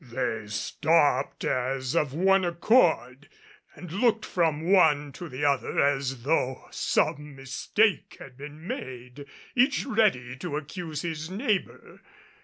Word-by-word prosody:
They 115 Hz, -3 st, -3 dB
stopped 145 Hz, +5 st, +1 dB
as 130 Hz, 0 st, -1 dB
of 145 Hz, -3 st, +1 dB
one 190 Hz, +5 st, +3 dB
accord, 170 Hz, -, +2 dB, 0.5 s
and 180 Hz, -3 st, -10 dB
looked 220 Hz, +3 st, +1 dB
from 160 Hz, -4 st, 0 dB
one 160 Hz, -6 st, +3 dB
to 170 Hz, +4 st, -9 dB
the 135 Hz, +3 st, -3 dB
other 140 Hz, -3 st, +1 dB
as 135 Hz, -3 st, 0 dB
though 130 Hz, -3 st, 0 dB
some 150 Hz, -1 st, -1 dB
mistake 135 Hz, -, 0 dB
had 125 Hz, -, -12 dB
been 150 Hz, +4 st, -10 dB
made, 130 Hz, -2 st, -7 dB, 0.3 s
each 260 Hz, +3 st, +2 dB
ready 210 Hz, -, +1 dB
to 145 Hz, +2 st, -4 dB
accuse 155 Hz, 0 st, -6 dB
his 160 Hz, -1 st, -4 dB
neighbor. 205 Hz, 0 st, -3 dB
150 Hz, 125 wpm, -27 LUFS, 130-180 Hz, 0.5 s, one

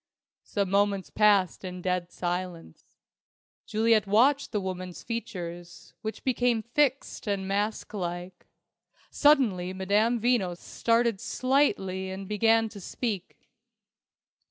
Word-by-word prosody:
Some 200 Hz, -3 st, -2 dB
moments 200 Hz, -1 st, +1 dB
passed 205 Hz, -4 st, +3 dB
in 180 Hz, -1 st, -6 dB
dead 180 Hz, -1 st, -1 dB
silence. 175 Hz, -, -5 dB, 0.8 s
Juliet 220 Hz, -1 st, +2 dB
watched 260 Hz, +8 st, +3 dB
the 210 Hz, -, 0 dB
woman's 185 Hz, -2 st, -6 dB
features, 175 Hz, -7 st, -6 dB
which 220 Hz, 0 st, -5 dB
became 245 Hz, -3 st, +1 dB
fixed 265 Hz, 0 st, 0 dB
and 200 Hz, -2 st, -1 dB
masklike. 190 Hz, -3 st, -3 dB, 0.6 s
Suddenly 220 Hz, -12 st, +3 dB
Madame 205 Hz, +5 st, +1 dB
Veno 215 Hz, -7 st, +1 dB
started 230 Hz, +1 st, 0 dB
slightly 230 Hz, -7 st, 0 dB
and 190 Hz, +1 st, -6 dB
began 225 Hz, +2 st, +3 dB
to 210 Hz, -, -10 dB
speak. 200 Hz, -1 st, -5 dB
200 Hz, 105 wpm, -28 LUFS, 185-230 Hz, 0.8 s, passed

